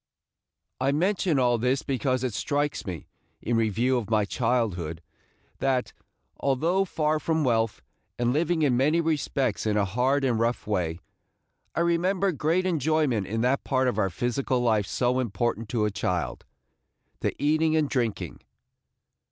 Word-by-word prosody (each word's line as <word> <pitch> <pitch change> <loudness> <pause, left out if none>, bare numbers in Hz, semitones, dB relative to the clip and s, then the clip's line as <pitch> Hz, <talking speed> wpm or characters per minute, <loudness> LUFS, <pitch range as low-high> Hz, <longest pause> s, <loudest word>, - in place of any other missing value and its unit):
I 135 +2 +2
mention 175 +1 +1
all 120 -2 +3
this 125 +4 +1
because 130 -2 -1
it 125 -4 -1
strikes 145 +3 -1
me, 85 -5 -5 0.3
in 120 - -1
review 115 +3 +2
of 110 -4 -4
my 110 -2 +2
childhood, 100 -9 -1 0.6
that, 130 -2 0 0.5
although 165 +8 +1
far 155 -3 0
from 160 +1 0
wealth, 115 - 0 0.3
and 120 0 +1
living 160 +2 +1
in 135 -4 +3
many 150 +6 +3
respects 140 -8 0
in 105 -1 +1
a 105 - +2
hard 125 +8 +1
and 120 -4 +1
rough 115 +1 0
way, 90 -5 -1 0.7
I - - +1
remember 180 +3 +2
great 165 +4 0
enjoyment 155 - +1
in 110 +2 -2
that 130 +3 +1
part 130 -1 +1
of 125 - 0
our 95 - +2
physical 125 +6 -1
life 110 -5 +2
so 125 +3 +1
important 115 -2 -2
to 110 -1 +1
a 105 - 0
child, 90 -3 -2 0.4
– - - -47
the - - -1
eating 155 +2 +2
and 155 -2 +2
drinking. 120 -6 -2
130 Hz, 155 wpm, -26 LUFS, 115-150 Hz, 0.7 s, all